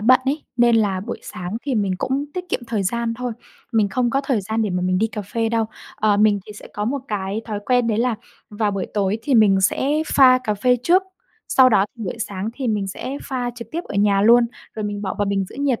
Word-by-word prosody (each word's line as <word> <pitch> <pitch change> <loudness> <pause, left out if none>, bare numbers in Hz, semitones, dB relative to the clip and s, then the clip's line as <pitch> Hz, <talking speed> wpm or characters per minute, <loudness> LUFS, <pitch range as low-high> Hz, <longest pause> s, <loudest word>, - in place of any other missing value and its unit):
bận 255 +5 +5
ấy, 285 +3 -1
nên 240 -1 +5
là 200 -4 +1
buổi 230 +5 -5
sáng 180 +4 -6
thì 275 -3 -2
mình 200 -3 +1
cũng 270 +5 -1
tiết 365 0 -3
kiệm - - -1
thời 220 -3 -1
gian 230 +4 -1
thôi, 245 0 -4 0.4
mình 215 -3 +3
không 240 +4 0
có 270 +2 +1
thời 255 -6 +1
gian 220 +3 -1
để 210 - -1
mà 180 0 -1
mình 185 0 +1
đi 220 - +2
cà 210 -1 -6
phê 225 +3 -2
đâu. 225 0 +1 0.3
Ờ, 210 -1 +2
mình 205 -1 +3
thì 210 - -9
sẽ 210 - -11
có 210 - -2
một 275 +5 -1
cái 200 0 -2
thói 210 -3 -4
quen 245 -2 +3
đấy 220 -2 0
là 240 0 +1 0.4
vào 210 0 0
buổi 195 -2 -3
tối 205 +1 +1
thì 270 +2 0
mình 205 -4 +5
sẽ 190 +7 +1 0.3
pha 255 -2 +7
cà 210 - 0
phê 250 +5 +2
trước, 360 +7 +4 0.5
sau 260 -1 +6
đó 200 -4 +4
thì 225 - -6
buổi 195 +4 -4
sáng 200 -1 -3
thì 260 -3 -3
mình 205 -2 0
sẽ 260 +8 -5
pha 250 -3 -2
trực 235 -2 -9
tiếp 335 - -2
ở - - -8
nhà 200 -1 +3
luôn 235 +2 +6 0.3
rồi 215 - -4
mình 205 0 -4
bỏ 190 - -3
vào 205 - +2
bình 195 -1 0
giữ - - -13
nhiệt 280 -4 0
220 Hz, 260 wpm, -21 LUFS, 205-245 Hz, 0.5 s, pha